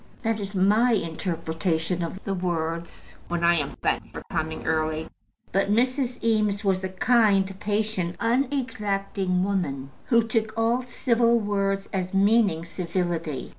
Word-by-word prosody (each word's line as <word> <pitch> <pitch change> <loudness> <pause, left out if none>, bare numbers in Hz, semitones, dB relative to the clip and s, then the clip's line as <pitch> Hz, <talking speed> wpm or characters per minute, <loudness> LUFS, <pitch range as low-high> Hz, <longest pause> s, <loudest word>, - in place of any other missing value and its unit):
That 225 -1 0
is 200 0 -6
my 210 +6 +4
interpretation 165 -1 -1
of 170 +3 -4
the 195 - -2
words 170 -2 -3
when 170 0 -2
I 170 0 +6
am - - -3
thanked - - 0
for - - -7
coming 160 0 -3
early. 155 0 0 0.4
But 195 +1 +1
Mrs. 250 +3 +1
Eames 215 -3 +1
was 190 -2 +1
a 190 - -2
kind, 195 -2 +2
patient, 205 -4 -1
unexacting 210 -7 0
woman, 145 -9 -2
who 235 -2 +4
took 220 -1 -1
all 230 +2 +2
civil 235 -1 +2
words 195 -2 -1
as 185 0 -2
meaning 200 -4 +3
civility. 170 -5 -3
195 Hz, 135 wpm, -25 LUFS, 170-225 Hz, 0.4 s, I